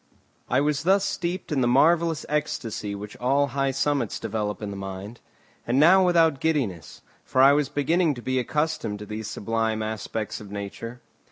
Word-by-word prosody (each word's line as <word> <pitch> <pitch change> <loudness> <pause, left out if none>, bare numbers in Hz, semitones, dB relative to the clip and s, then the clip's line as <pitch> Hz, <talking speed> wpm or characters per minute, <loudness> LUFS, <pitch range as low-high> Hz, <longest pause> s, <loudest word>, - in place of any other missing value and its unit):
I 130 +2 +3
was 145 -1 0
thus 195 +4 +3
steeped 180 -2 -3
in 140 -3 +1
the 120 - +2
marvellous 165 +5 +3
ecstasy 145 -9 -2
which 105 +1 -8
all 140 +3 +2
high 135 +1 0
summits 135 -3 -1
develop 105 -1 -3
in 105 -2 -5
the - - -6
mind; 95 +3 -7 0.5
and 125 +3 +2
now 185 +5 +7
without 165 -5 +3
giddiness, 130 - -2 0.2
for 130 - -2
I 135 +2 +8
was 145 -1 +1
beginning 150 +2 +1
to 120 - -8
be 130 0 0
accustomed 140 -5 -1
to 105 - -8
these 105 +1 -6
sublime 110 +1 -1
aspects 110 0 -4
of 105 - -10
nature. 105 +4 -7
130 Hz, 175 wpm, -25 LUFS, 110-150 Hz, 0.5 s, I